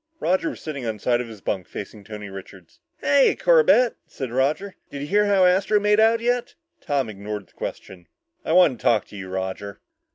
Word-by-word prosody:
Roger 185 Hz, -2 st, +1 dB
was -, -, -8 dB
sitting 145 Hz, -4 st, -6 dB
on 110 Hz, -2 st, -2 dB
the -, -, -15 dB
side 120 Hz, +3 st, +1 dB
of 125 Hz, -, -6 dB
his 110 Hz, -3 st, -11 dB
bunk 95 Hz, -4 st, -3 dB
facing 105 Hz, -, -8 dB
Tony 105 Hz, 0 st, -8 dB
Richards. 95 Hz, -2 st, -12 dB, 0.2 s
"Hiya, 280 Hz, -1 st, +4 dB
Corbett," 470 Hz, -, +4 dB
said 130 Hz, -4 st, -6 dB
Roger, 145 Hz, +10 st, 0 dB, 0.2 s
"did 140 Hz, -, -7 dB
you 145 Hz, -, -4 dB
hear 205 Hz, +5 st, +3 dB
how 195 Hz, -2 st, +4 dB
Astro 195 Hz, +3 st, +3 dB
made 210 Hz, +1 st, +3 dB
out 225 Hz, +1 st, +4 dB
yet?" 245 Hz, +1 st, -1 dB, 0.3 s
Tom 140 Hz, -4 st, -1 dB
ignored 105 Hz, -1 st, -6 dB
the -, -, -30 dB
question. 90 Hz, -3 st, -8 dB, 0.4 s
"I 160 Hz, -, -1 dB
want 165 Hz, -9 st, +5 dB
to -, -, -17 dB
talk 110 Hz, -4 st, +3 dB
to -, -, -12 dB
you, 95 Hz, -2 st, -7 dB
Roger." 95 Hz, +2 st, -5 dB
130 Hz, 205 wpm, -23 LUFS, -, 0.4 s, want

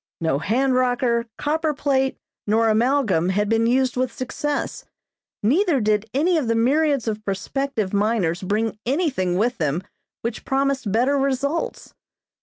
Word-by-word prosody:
No 160 Hz, -4 st, 0 dB
hand 255 Hz, -, +1 dB
rocker, 245 Hz, -2 st, +1 dB
copper 310 Hz, 0 st, 0 dB
plate, 270 Hz, -1 st, 0 dB, 0.3 s
nor 225 Hz, +2 st, +3 dB
amalgam 220 Hz, -, +2 dB
had 205 Hz, +2 st, +1 dB
been 225 Hz, +1 st, +2 dB
used 255 Hz, +1 st, +2 dB
with 255 Hz, -1 st, 0 dB
success, 285 Hz, +4 st, -3 dB, 0.6 s
neither 310 Hz, -, +3 dB
did 215 Hz, 0 st, 0 dB
any 325 Hz, +5 st, +2 dB
of 265 Hz, -, -3 dB
the 230 Hz, -, +1 dB
myriads 280 Hz, +2 st, +2 dB
of 215 Hz, -1 st, -2 dB
prospective 215 Hz, +2 st, -2 dB
miners 200 Hz, -4 st, +1 dB
bring 215 Hz, +3 st, -1 dB
anything 255 Hz, -, 0 dB
with 235 Hz, +3 st, 0 dB
them 155 Hz, +3 st, -1 dB, 0.4 s
which 230 Hz, 0 st, -4 dB
promised 270 Hz, -5 st, 0 dB
better 255 Hz, +6 st, +2 dB
results. 275 Hz, +4 st, -2 dB
240 Hz, 140 wpm, -22 LUFS, 210-275 Hz, 0.6 s, nor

